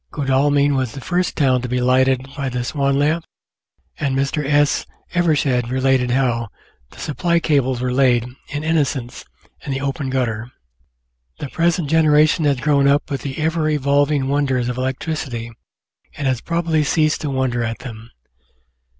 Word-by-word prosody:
Godalming 140 +1 +2
was 130 -4 -1
the 140 - -7
first 180 +5 -1
town 130 -4 +3
to 125 - -5
be 125 +1 0
lighted 130 +1 +2
by 140 -2 -2
the 125 -1 -3
Swan 140 +1 0
lamp, 155 +4 +1 0.8
and 135 -1 0
Mr. 140 +2 0
S. 145 +1 +2 0.3
Evershed 145 -8 +1
related 130 -1 +1
how 125 -2 +1 0.4
"the - - -18
supply 170 +3 0
cables 130 -6 +1
were 125 0 -1
laid, 125 -3 +3 0.2
in 145 0 -4
innocence, 145 -6 -1 0.4
in - - -5
the 135 0 -2
open 140 0 -2
gutter." 120 -2 -2 0.9
The 145 - -6
present 170 0 0
generation 155 +1 +4
has 140 -3 +2
grown 140 -1 +3
up 140 +1 +2
with 140 - -2
the 135 -2 -5
ever 160 0 0
evolving 145 -1 +1
wonders 135 -3 0
of 125 - -4
electricity 130 -3 -3 0.7
and 145 - -3
has 130 -3 0
probably 165 -2 0
ceased 155 +1 +1
to 150 - -2
wonder 130 -3 -1
at 115 0 -3
them. 115 -3 -10
140 Hz, 160 wpm, -20 LUFS, 130-150 Hz, 0.9 s, generation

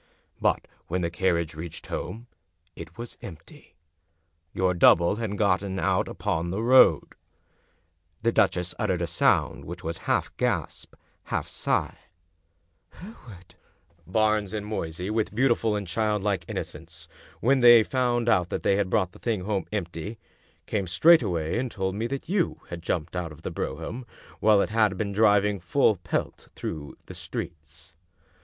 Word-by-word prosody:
But - - +1 0.2
when 90 +2 -1
the 85 - -1
carriage 85 -2 0
reached 80 +1 -7
home 115 +2 -5 0.5
it 85 - -10
was 120 0 -8
empty. 80 -4 -12 0.8
Your 95 0 +1
double 85 +2 +5
had 110 -3 -3
got 100 -3 +2
out 95 -4 0
upon 85 +1 -2
the 100 +5 -2
road." 130 +2 +5 1.1
The 115 - +3
duchess 90 -5 +1
uttered - - 0
a - - +1
sound - - +1
which 85 +2 -8
was 80 +1 -4
half - - 0
gasp, - - -2 0.3
half - - -2
sigh. - - -1 0.9
"Hereward!" 120 - -13 0.3
" 85 -1 -35
Barnes 110 +1 +1
and 105 -1 -3
Moysey, 90 -2 -4
with 110 -2 -1
beautiful 115 -3 +2
and 100 -1 -3
childlike 105 -2 -1
inno - - -3
cence, - - -13 0.3
when 135 +3 +3
they 120 -2 +8
found 120 -1 0
that 90 -6 +1
they 100 - +3
had 100 -2 0
brought 95 -4 +1
the - - -16
thing 110 -5 -1
home 100 0 -2
empty, 100 +1 -4 0.5
came 100 -3 -2
straightway 90 - +3
and 130 0 -2
told 95 -3 -2
me 110 +4 -2
that 135 +2 -5
you 180 0 0
had 85 -1 -6
jumped 85 0 -3
out 90 -3 -3
of 75 +1 -14
the - - -4
brougham 125 +1 -5 0.3
while 105 -2 +5
it - - -3
had 105 -3 +2
been 100 0 -2
driving 105 -1 +3
full 110 +3 +2
pelt 90 -2 -4
through 75 -2 -6
the - - -10
streets. 80 0 -8
100 Hz, 155 wpm, -26 LUFS, 85-110 Hz, 1.1 s, they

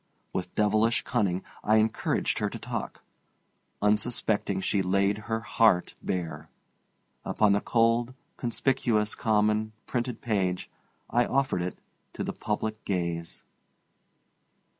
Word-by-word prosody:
With 90 - -4
devilish 110 +2 +3
cunning 100 -8 0 0.2
I 110 - +4
encouraged 110 0 +1
her - - 0
to - - -6
talk. - - -5 0.8
Unsuspecting, 105 -2 +1
she 95 +1 +1
laid 100 +2 +2
her 110 0 0
heart 110 -4 +3
bare. 80 -4 -3 0.7
Upon 105 -2 +2
the 100 +1 +3
cold, 115 +2 +2 0.2
conspicuous, 120 -3 +1
common, 110 0 +1
printed 120 -1 -2
page 95 -5 -1 0.4
I 120 0 +2
offered 135 -9 +1
it 90 +1 -3 0.4
to - - -3
the - - -3
public 110 +1 -3
gaze. 85 -3 -3
105 Hz, 115 wpm, -28 LUFS, 95-115 Hz, 0.8 s, I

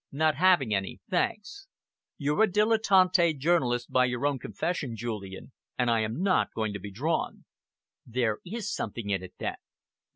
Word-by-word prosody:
"Not 155 +2 +2
having 155 - +3
any, 95 -3 -2
thanks. 390 - -2 0.5
You're 150 +3 0
a - - -4
dilettante 190 -5 +3
journalist 130 -6 +1
by 130 0 +4
your 125 +1 -2
own 145 -2 +1
confession, 145 -8 -3
Julian, 105 -2 -6 0.3
and 125 -1 +2
I 115 - +3
am 110 +10 -2
not 195 -2 +2
going 110 -2 -1
to 100 - -5
be 100 +2 -7
drawn." 145 +12 -2 0.6
"There 115 -3 -1
is 205 +2 -4
something 105 -1 -4
in 95 -2 0
it, 95 - -11
then?" - - -3
135 Hz, 160 wpm, -28 LUFS, 110-180 Hz, 0.6 s, by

